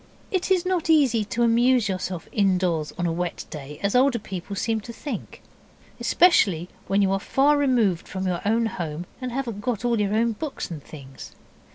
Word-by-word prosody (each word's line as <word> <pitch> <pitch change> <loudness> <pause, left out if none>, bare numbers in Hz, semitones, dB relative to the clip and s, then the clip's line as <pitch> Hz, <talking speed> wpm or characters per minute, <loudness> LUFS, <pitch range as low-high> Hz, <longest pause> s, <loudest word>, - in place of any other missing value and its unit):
It 375 -1 -1
is 370 -2 +2
not 365 -3 0
easy 270 -8 +4
to 235 +3 -1
amuse 240 0 +4
yourself 185 -3 -4
indoors 180 -6 +1
on 175 - -1
a 170 - +1
wet 175 0 -3
day 150 0 -8
as 200 - +1
older 255 0 +4
people 200 -2 -6
seem 220 +2 -1
to 235 - -8
think, 285 +5 -7 0.6
especially 195 - +3 0.2
when 200 +1 +2
you 190 - +2
are 195 - +1
far 280 +8 +3
removed 240 - +2
from 190 0 -4
your 180 -2 -1
own 225 +3 +2
home, 170 -5 -4 0.2
and 255 -1 -3
haven't 235 -5 -3
got 240 0 -2
all 235 -3 +2
your 205 0 0
own 230 +1 +2
books 270 - -5
and 155 -4 -7
things. 135 -3 -11
210 Hz, 190 wpm, -24 LUFS, 180-250 Hz, 0.6 s, easy